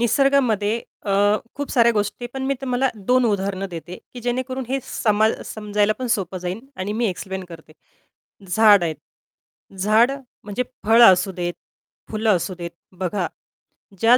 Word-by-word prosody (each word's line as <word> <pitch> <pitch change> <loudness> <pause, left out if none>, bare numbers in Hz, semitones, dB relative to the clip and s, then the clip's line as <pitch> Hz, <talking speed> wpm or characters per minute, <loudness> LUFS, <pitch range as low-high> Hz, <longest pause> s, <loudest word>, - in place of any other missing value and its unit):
निसर्गामध्ये 235 -4 +2 0.2
अ, 200 - -1 0.4
खूप 285 0 -4
साऱ्या 235 -2 +4
गोष्टी, 210 +3 -2
पण 265 0 -4
मी 275 - +1
तुम्हाला 260 0 +1 0.2
2 255 0 +4
उदाहरणं 195 -2 0
देते, 175 +1 -7 0.2
की 245 - -7
जेणेकरून 255 +2 -2
हे 270 +1 0
सम 215 -2 0 0.2
समजायला 210 0 0
पण 255 - -3
सोपं 185 -3 -4
जाईल 180 +4 -4 0.2
आणि 200 +3 -2
मी 230 +1 0
एक्सप्लेन 190 0 -4
करते. 160 -2 -12 0.8
झाड 205 -1 +6
आहेत. 160 -2 -1 0.8
झाड 215 +6 +4 0.3
म्हणजे 210 +4 -2 0.2
फळं 230 +2 +7
असू 185 +2 -1
देत. 175 -1 -3 0.6
फुलं 220 0 0
असू 185 +2 -2
देत. 170 0 -5 0.3
बघा. 185 0 -1 0.7
ज्या 235 +2 +6
210 Hz, 150 wpm, -22 LUFS, 190-245 Hz, 0.8 s, फळं